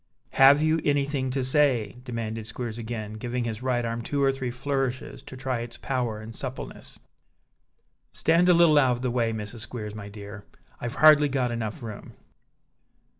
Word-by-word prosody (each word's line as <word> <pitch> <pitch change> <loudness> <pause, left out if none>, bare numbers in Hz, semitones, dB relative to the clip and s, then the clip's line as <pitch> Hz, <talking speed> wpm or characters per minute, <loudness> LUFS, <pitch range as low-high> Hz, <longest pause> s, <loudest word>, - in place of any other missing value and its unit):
"Have 140 +3 +6
you 155 0 +2
anything 140 -2 0
to 130 +1 -1
say?" 130 -6 +2
demanded 115 -3 -5
Squeers 115 -1 -5
again, 110 -2 -5
giving 120 +3 -3
his 115 -1 -4
right 125 -2 0
arm 115 0 -3
two 140 +4 -1
or 135 - +4
three 135 -2 -4
flourishes 130 0 -3
to 130 - -11
try 130 -2 -2
its 120 0 -6
power 120 -5 -2
and 110 +1 -9
suppleness. 130 -1 -7 1.1
"Stand 170 +2 +3
a - - +8
little 165 -3 +6
out 130 -3 +4
of 120 - -5
the 125 - 0
way, 120 -2 +1
Mrs. 110 +1 -4
Squeers, 110 -1 -6
my 105 -1 -8
dear; 100 0 -9 0.4
I've 120 - -4
hardly 150 -1 +7
got 130 -3 0
enough 115 -1 -4
room." 110 -3 -8
125 Hz, 175 wpm, -26 LUFS, 115-135 Hz, 1.1 s, a